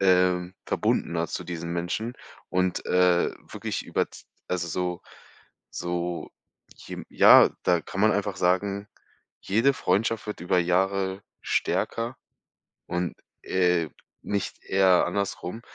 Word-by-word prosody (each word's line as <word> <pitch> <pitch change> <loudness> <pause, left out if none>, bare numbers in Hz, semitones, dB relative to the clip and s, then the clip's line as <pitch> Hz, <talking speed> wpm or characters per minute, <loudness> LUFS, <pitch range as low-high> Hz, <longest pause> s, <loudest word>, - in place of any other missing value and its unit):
ähm, 90 -1 +3
verbundener 85 0 0
zu - - -4
diesen 85 -1 -5
Menschen 90 +7 -2 0.4
und, 90 -1 0
äh, 90 -1 +3 0.2
wirklich - - -4
über - - 0
z - - -13 0.2
also, 85 -2 -1
so 90 +1 -2 0.7
so 85 0 -3 0.5
je - - -8
ja, - - +8
da 85 -1 +3
kann 95 - -5
man 110 +1 +5
einfach 100 -1 -1
sagen: 100 +3 0 0.5
„Jede 115 +8 +2
Freundschaft 110 +3 0
wird 105 - -5
über 90 +1 +1
Jahre 95 +2 +1 0.2
stärker 115 +3 -1 0.7
und, 90 0 -2 0.3
äh, 90 -3 +2 0.3
nicht 100 -1 -3
eher 95 -2 +4
andersrum.“ 100 +1 -3
90 Hz, 120 wpm, -26 LUFS, 90-100 Hz, 0.7 s, ja